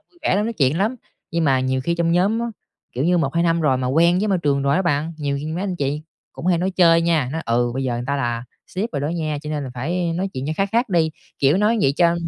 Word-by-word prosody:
vui 345 - -25
vẻ - - +2
lắm, 205 - +1
nói 230 - -2
chuyện 150 - +1
lắm. 220 +6 0 0.3
Nhưng 165 0 0
mà 135 -3 +3
nhiều 130 0 0
khi 170 - +1
trong 170 0 +1
nhóm 200 +6 +2
á, 235 - -1 0.5
kiểu 130 +3 -2
như 175 +1 +3
1-2 165 +3 +1
năm 170 -1 +2
rồi 145 -5 +2
mà 130 0 -2
quen 170 +7 +3
với 210 +2 0
môi 190 - +2
trường 140 -4 +1
rồi 140 +3 +2
á 190 - +2
bạn, 160 -1 0
nhiều 145 -2 -2
khi 150 - -5
mấy 160 +3 -3
anh 185 -3 -2
chị 145 0 -2 0.3
cũng - - -7
hay 180 -2 +3
nói 185 +3 0
chơi 170 -3 +4
nha, 160 -6 +1
nói: 160 +1 -3
"Ừ, 120 +1 +1
bây 135 0 -2
giờ 125 - -1
người 120 +1 -3
ta 140 - 0
là 120 -3 -2 0.2
sếp 200 +5 -3
rồi 145 - -2
đó 145 - -1
nha 155 -3 -2
cho 150 - -5
nên 150 -2 -2
là 130 - -6
phải 170 +7 -1
nói 190 +3 -1
chuyện 130 +1 -4
cho 155 - -1
khác 195 0 +1
khác 235 +2 +2
đi", 165 -4 +2 0.3
kiểu, 140 +5 +3
nói 215 +3 +2
vậy 135 - +3
cho 170 0 +4
165 Hz, 300 wpm, -21 LUFS, 140-180 Hz, 0.5 s, chơi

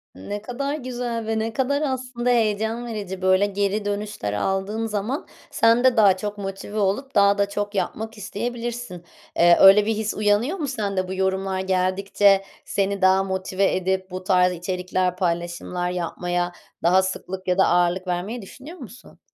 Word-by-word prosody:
Ne 205 - -6
kadar 275 +6 -3
güzel 245 -4 -4
ve 220 0 0
ne 225 +1 -2
kadar 280 +4 0
aslında 255 -3 -2
heyecan 225 0 +1
verici. 200 -5 -5
Böyle 185 +1 +4
geri 205 +1 -1
dönüşler 205 - -3
aldığın 195 - -1
zaman, 220 +6 -3 0.2
sen 230 +2 +3
de 255 -2 +4
daha 200 -4 +6
çok 205 +2 -5
motive 195 +1 -6
olup 210 +8 -1
daha 200 0 +5
da 200 0 +1
çok 205 +1 -3
yapmak 220 +3 -3
isteyebilirsin. 235 -2 -5 0.3
Eee, 170 0 +6
öyle 195 +2 +8
bir 220 +1 0
his 215 0 -2
uyanıyor 215 - +1
mu 305 -5 -3
sende? 200 -7 -2
Bu 185 - -4
yorumlar 190 0 -1
geldikçe 190 +1 +2 0.2
seni 200 -1 -1
daha 190 +1 +4
motive 190 0 0
edip, 190 0 -1
bu 185 0 -5
tarz 180 -1 +3
içerikler, 180 +1 -2
paylaşımlar 175 0 -2
yapmaya 175 0 -2 0.3
daha 180 +3 +5
sıklık 190 0 -5
ya 180 0 +1
da 190 - +5
ağırlık 175 +1 +1
vermeyi 185 +7 -3
düşünüyor 270 - -11
musun? 250 -4 -13
200 Hz, 160 wpm, -23 LUFS, 185-225 Hz, 0.3 s, öyle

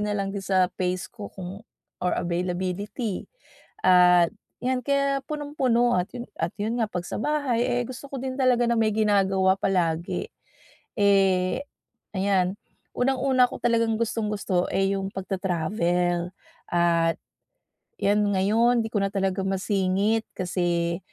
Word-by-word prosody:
nalang 205 -2 -1
din 200 - -4
sa 185 -2 +3
pace 180 0 -2
ko 215 -4 -8
kung 190 +1 -8 0.4
or 180 0 0
availability. 185 +4 -2 0.6
At 180 -2 +6 0.3
yan, 255 0 +1
kaya 280 0 +1
punong-puno 265 -6 +1
at 180 0 0
'yon 245 -1 -6
at - - -2
'yon 225 +4 -2
nga, 220 - +1
'pag 180 -3 -4
sa - - -5
bahay, 285 -4 0
eh 245 -1 0
gusto 255 +3 -8
ko 275 - -6
din 260 0 -4
talaga 250 -2 +3
na 235 - +2
may 220 -1 +2
ginagawa 195 -3 +3
palagi. 170 -3 0 0.7
Eh, 195 -3 +3 0.6
ayan. 190 -1 +1 0.4
Unang-una 260 0 +3
ko - - -8
talagang 230 -1 +2
gustong-gusto, 210 -5 -1
eh 195 0 +1
yung 195 0 -3
pagtatravel. 180 -2 -1 0.4
At 170 -1 +2 0.8
yan 210 +1 +2
ngayon 215 +5 +3
'di - - -4
ko 210 - 0
na - - +2
talaga 195 -1 0
masingit 195 +2 +1
kasi, 175 -2 -1
195 Hz, 135 wpm, -25 LUFS, 180-230 Hz, 0.8 s, At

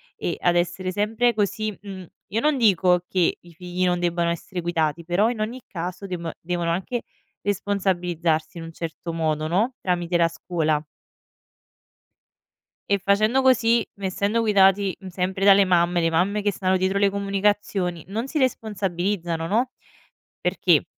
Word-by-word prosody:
e 170 - -3
ad 175 0 +2
essere 175 +2 0
sempre 225 +5 +1
così 215 0 -1
mhmm, 190 -3 -8 0.2
io 215 +4 -1
non 300 0 +2
dico 180 -5 +3
che 180 -3 +1
i 175 -1 -17
figli 180 +1 -4
non 175 0 +1
debbano 170 -1 0
essere 175 +2 -4
guidati, 165 -1 -1
però 185 +7 +2
in 225 -3 -3
ogni 240 +4 -3
caso 180 +2 -5
deb 170 -3 -4
devono 175 0 -2
anche 195 +7 -2 0.4
responsabilizzarsi 180 -5 -1
in - - -7
un 165 - -8
certo 165 +1 -6
modo, 155 -1 -1
no, 215 +10 +1
tramite 175 -1 -1
la 170 -1 +3
scuola. 160 -2 -1 2.1
E 200 -1 +3
facendo 215 +7 +2
così, 235 -3 +3
essendo 200 +3 0
guidati, 195 -2 +4
mhmm, 190 - -10
sempre 190 +2 -2
dalle 200 0 +7
mamme, 175 -1 +2
le 165 - +2
mamme 195 +6 +1
che 205 0 +1
stanno 185 0 +1
dietro 190 +2 0
le 200 -1 +4
comunicazioni, 200 -3 -1
non 225 +6 -3
si 310 - -3
responsabilizzano, 190 - -1
no? 240 +6 +1 0.7
Perché - - +2
185 Hz, 150 wpm, -24 LUFS, 175-205 Hz, 2.1 s, dalle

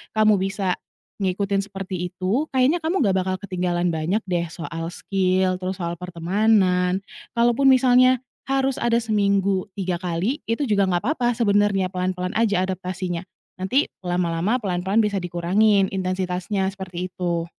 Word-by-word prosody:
kamu 215 -1 +5
bisa 195 -1 -1 0.4
ngikutin 195 +1 0
seperti 190 -3 -5
itu, 195 - -1
kayaknya 265 +6 +2
kamu 335 +4 0
gak 195 - +3
bakal 185 0 0
ketinggalan 180 -3 -1
banyak 160 +6 0
deh 175 -2 0
soal 165 -1 -5
skill 185 0 0
terus 185 +1 -3
soal 170 -1 -2
pertemanan, 180 +1 +2 0.4
kalaupun 240 +3 +3
misalnya 255 0 +5 0.3
harus 270 -1 +1
ada 235 -1 +3
seminggu 200 -3 +1
3 185 -3 -1
kali, 185 - -1
itu 230 +6 0
juga 200 -3 +3
nggak 175 0 0
papa 240 -4 +1
sebenernya 205 -4 +2
pelan-pelan 180 0 -2
aja 205 -5 +2
adaptasinya, 185 -2 -4 0.4
nanti 190 +10 +1 0.2
lama-lama 175 +4 0
pelan-pelan 190 +1 -1
bisa 205 -1 0
dikurangin 190 +4 +2
intensitasnya, 185 +1 -1
seperti 185 -2 -6
itu. 170 -2 -1
190 Hz, 135 wpm, -23 LUFS, 180-210 Hz, 0.4 s, kamu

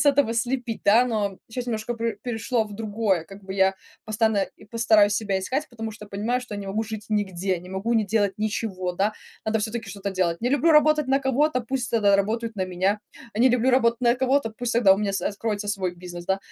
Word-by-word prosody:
с 295 - +2
этого 280 -5 +4
слепить, 240 -1 -2
да. 225 +5 +6
Но 210 -5 -1
щас 250 +1 -4
немножко 225 0 -2
пер 230 0 -2
перешло 235 -1 -1
в 210 -1 -10
другое, 205 -5 0
как 195 +4 -13
бы, 190 - -6
я 190 0 +3 0.3
постоянно 220 -1 +1 0.2
и - - -13
постараюсь 220 -3 +4
себя 205 -3 -1
искать, 270 +11 -2
потому 225 -2 -5
что 210 -1 -11
понимаю, 215 +5 -1
что 250 -5 -7
не 200 -1 -6
могу 215 +3 -1
жить 215 -1 -7
нигде, 190 -3 0
не 180 - -12
могу 205 +5 -1
не 220 -2 +3
делать 205 -2 +1
ничего, 205 -4 -2
да, 200 +4 0 0.3
надо 220 0 +1
всё-таки 225 +1 -4
что-то 200 -1 -4
делать. 170 -3 0
Не 245 - 0
люблю 290 +4 +3
работать 300 -2 +4
на 270 +1 +4
кого-то, 265 +1 +1
пусть 245 0 -3
тогда 205 -3 +4
работают 225 +2 -1
на 185 -1 -1
меня. 190 +3 0 0.3
А - - -4
не 255 - +7
люблю 250 +1 +3
работать 235 -2 +3
на 240 -1 +4
кого-то, 260 -1 +1
пусть 235 +2 -3
тогда 210 -5 +6
у - - -4
меня 200 -2 -1
с 195 - -2
откроется 205 0 -3
свой 190 -4 -1
бизнес, 175 -1 -8
да. 190 0 +1
220 Hz, 225 wpm, -25 LUFS, 200-240 Hz, 0.3 s, не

